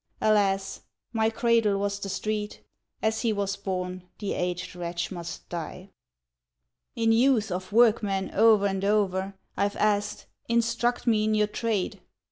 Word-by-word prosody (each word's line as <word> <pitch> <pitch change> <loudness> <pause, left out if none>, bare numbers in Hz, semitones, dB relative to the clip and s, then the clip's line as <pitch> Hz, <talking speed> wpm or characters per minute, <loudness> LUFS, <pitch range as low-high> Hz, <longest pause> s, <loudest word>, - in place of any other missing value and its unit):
Alas! 195 -2 +1 0.3
my 220 -1 +2
cradle 225 -3 +2
was 200 0 -1
the 200 - -5
street! 210 +2 -3 0.4
As 220 0 +1
he 230 - +1
was 200 -1 -1
born 185 -2 -4
the 205 -2 -3
aged 180 0 -3
wretch 175 +1 -3
must 170 -3 -7
die. 180 +3 -6 1.0
In 225 -1 +2
youth, 225 -3 +3
of 185 +2 -4
workmen, 210 -4 +3
o'er 215 -1 +5
and 195 -1 -1
o'er, 195 -2 +1 0.2
I've 200 +1 0
asked, 205 -1 0 0.2
"Instruct 235 +1 +1
me 220 -3 +3
in 215 0 +2
your 210 0 +3
trade." 210 -3 -2
205 Hz, 140 wpm, -27 LUFS, 190-220 Hz, 1.0 s, o'er